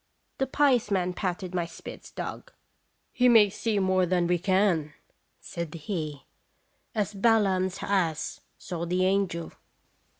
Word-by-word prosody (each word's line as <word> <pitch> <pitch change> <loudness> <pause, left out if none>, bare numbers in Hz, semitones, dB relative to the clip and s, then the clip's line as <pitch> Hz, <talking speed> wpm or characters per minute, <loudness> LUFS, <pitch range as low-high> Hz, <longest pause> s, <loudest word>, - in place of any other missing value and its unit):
The 270 - +1
pious 265 -5 +3
man 180 -2 0
patted 185 0 -3
my 175 -2 -1
Spitz - - -10
dog. - - -7 0.3
" - - -47
He 250 0 +4
may 215 -4 +6
see 215 +1 -1
more 185 -1 +2
than 175 -1 +2
we 175 0 +1
can," 185 -5 +1 0.4
said 170 -1 -6
he, 155 -4 -5 0.7
"as 210 -1 -1
Balaam's 195 -3 +2
ass 175 -6 -1 0.2
saw 170 -1 -5
the 180 +2 +1
angel." 190 -3 0
185 Hz, 135 wpm, -27 LUFS, 175-205 Hz, 0.7 s, may